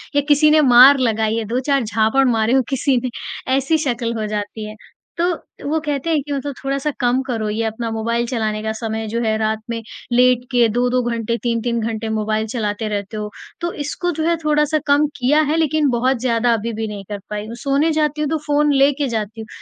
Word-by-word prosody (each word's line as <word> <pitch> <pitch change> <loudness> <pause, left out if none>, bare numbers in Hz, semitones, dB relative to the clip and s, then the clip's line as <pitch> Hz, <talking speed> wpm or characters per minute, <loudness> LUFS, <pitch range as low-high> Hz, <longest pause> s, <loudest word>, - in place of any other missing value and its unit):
या 285 - +4
किसी 300 +1 +5
ने 310 - +5
मार 260 +1 +8
लगाई 220 -3 +1
है 225 - -2
2-4 255 +4 0
झापड़ 220 +4 +2
मारे 225 0 +1
हों 265 - +5
किसी 270 0 +1
ने, 250 +1 -2 0.5
ऐसी 275 +4 +2
शक्ल 245 -6 -1
हो 215 - -2
जाती 210 +1 -4
है। 215 - -9 0.4
तो 340 - +1 0.4
वो 320 +1 +1
कहते 295 0 -3
हैं 315 -3 +2
कि 290 - -5
मतलब 280 +1 -3
"थोड़ा-सा 275 +2 -1
कम 250 +1 +2
करो 225 -4 -2
ये 220 +2 -1
अपना 225 +1 -3
मोबाइल 235 +2 -1
चलाने 220 -3 -2
का 220 - -1
समय 220 -1 -3
जो 230 +2 -2
है। 220 -1 +1
रात 220 0 0
में 230 -1 -3 0.3
लेट 250 0 +4
के 240 -2 +4
2-2 245 +3 +1
घंटे 230 0 -2
3-3 235 0 0
घंटे 225 0 -3
मोबाइल 215 +1 -1
चलाते 215 -2 -2
रहते 205 +1 -4
हो।" 210 0 -4 0.3
तो 345 0 -1
इसको 350 +5 -2
जो - - +1
है 340 - +3
थोड़ा-सा 300 0 +2
कम 285 +1 +4
किया 285 +4 +3
है 320 - +1
लेकिन 310 -2 +2
बहुत 255 +2 +1
ज़्यादा 235 -1 +2
अभी 230 +1 -2
भी 220 0 -3
नहीं 205 -2 -7
कर 205 -1 -4
पाई 210 0 -4
हूँ। 230 - -7
सोने 280 +4 +2
जाती 300 -1 0
हूँ 300 - 0
तो 320 - 0
फ़ोन 295 0 +3
लेके 280 +1 +3
जाती 220 -2 -4
हूँ। 220 - -9
240 Hz, 215 wpm, -19 LUFS, 220-285 Hz, 0.5 s, मार